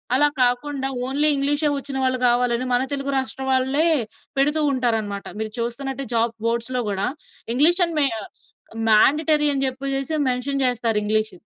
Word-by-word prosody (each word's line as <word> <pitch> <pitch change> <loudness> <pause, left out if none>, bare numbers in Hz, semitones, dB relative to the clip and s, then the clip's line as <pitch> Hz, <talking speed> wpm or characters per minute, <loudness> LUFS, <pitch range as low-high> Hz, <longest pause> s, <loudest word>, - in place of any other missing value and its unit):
అలా 295 +2 +5 0.2
కాకుండా 265 +2 -1 0.2
ఓన్లీ 285 +3 +1
ఇంగ్లీషే 290 +2 +1
వచ్చిన 275 -1 -5
వాళ్ళు 255 0 +1
కావాలని 245 +1 +1
మన 245 - +3
తెలుగు 275 0 -2
రాష్ట్రం 265 0 -3
వాళ్ళే 265 +4 +2 0.5
పెడుతూ 295 +3 +2
ఉంటారన్నమాట. 220 -6 -1
మీరు 220 0 -4
చూస్తున్నట్టే 270 +3 -4
జాబ్ 230 0 +1
బోర్డ్స్‌‌లో 235 +2 -1
గూడా 200 0 -1 0.5
ఇంగ్లీష్ 345 +7 +4
అని 335 -1 -6
మే 280 - +5 0.2
ఆహ్, - - -10 0.6
మాండేటరీ 300 +7 +4
అని 270 - -1
జెప్పేసేసి 275 +3 -3
మెన్షన్ 265 +2 -1
చేస్తారు 230 -3 +1
ఇంగ్లీష్. 215 0 0
265 Hz, 145 wpm, -22 LUFS, 235-280 Hz, 0.6 s, అలా